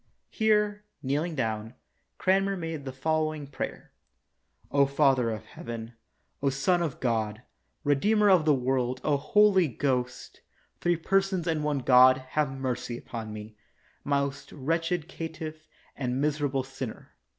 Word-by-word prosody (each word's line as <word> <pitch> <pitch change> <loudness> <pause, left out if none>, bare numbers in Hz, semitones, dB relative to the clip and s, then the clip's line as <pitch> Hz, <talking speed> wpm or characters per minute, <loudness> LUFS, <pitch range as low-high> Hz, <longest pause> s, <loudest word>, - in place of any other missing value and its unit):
[Here, 210 -2 +2 0.2
kneeling 150 +5 -1
down, 110 -2 -2 0.4
Cranmer 195 +1 +2
made 165 -4 -5
the 130 - -4
following 155 +2 -1
prayer:] 140 - -6 1.0
Father 135 -4 +3
of 110 -1 -5
heaven, 115 0 -7 0.5
O 140 - +2
Son 175 +7 +1
of 160 -6 -2
God, 110 -2 -1 0.4
Redeemer 205 +10 +3
of 185 -5 +6
the 155 - +4
world, 130 -1 0
O 150 - +2
Holy 195 +3 +4
Ghost, 125 -1 -2 0.4
three 175 0 +2
persons 190 0 +1
and 160 -3 0
one 150 -1 0
God, 130 +1 +7
have 150 -1 +1
mercy 130 -3 -3
upon 115 -3 -7
me, 105 0 -8 0.5
most 140 -1 -1
wretched 165 +3 -1
caitiff 160 -3 -7 0.3
and 125 -1 -2
miserable 145 -2 0
sinner. 130 -3 -7
140 Hz, 130 wpm, -28 LUFS, 130-165 Hz, 1.0 s, God